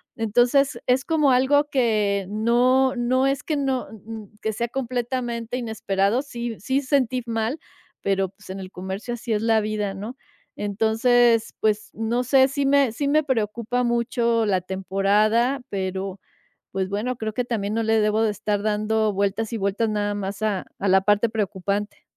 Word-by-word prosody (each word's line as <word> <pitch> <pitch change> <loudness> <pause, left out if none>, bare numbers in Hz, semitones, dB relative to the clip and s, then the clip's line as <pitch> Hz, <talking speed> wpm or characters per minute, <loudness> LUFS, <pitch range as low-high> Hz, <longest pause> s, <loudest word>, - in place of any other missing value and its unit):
entonces 245 +5 +2
es 255 +2 +2
como 305 -4 +3
algo 285 +3 +3
que 210 -7 +1
no 245 +5 +3
no 255 +2 +2
es 275 +1 +1
que 305 - -2
no 270 -3 -1
n 220 - -12
n 220 -2 -8
que 220 - -1
sea 235 +2 -2
completamente 240 -1 -3
inesperado, 220 -1 0
sí 235 -4 -5
sí, 270 +1 0
sentí 255 -3 +1
mal, 225 +4 -1 0.4
pero, 195 -1 +1
pues, 195 +1 -18
en 190 - -5
el 185 -1 -7
comercio 190 +6 -5
así 240 0 -5
es 210 - 0
la 225 -1 +3
vida, 210 -2 -2
¿no?, 210 +6 -7 0.4
entonces, 225 +3 +2
pues, 215 -1 +1
no 230 +3 -1
sé, 265 +1 +5
si 280 +1 -1
me 275 -3 +4
si 280 +6 -2
me 305 +2 +3
preocupa 235 -1 -1
mucho 235 -1 +1
la 195 -3 +2
temporada, 205 +7 +1
pero, 190 0 -3 0.5
pues 190 -1 -2
bueno, 215 +6 -2
creo 220 -2 -4
que 250 - -1
también 215 -3 -2
no 230 - 0
le 225 0 +2
debo 215 +1 +2
de 220 - +2
estar 205 0 -2
dando 215 0 +1
vueltas 200 +3 -1
y - - -1
vueltas 200 +2 0
nada 205 -1 -1
más 200 +1 -5
a 205 -4 0
a 200 - -2
la 190 +1 +5
parte 205 +3 +2
preocupante. 205 -1 -3
225 Hz, 175 wpm, -23 LUFS, 205-250 Hz, 0.5 s, sé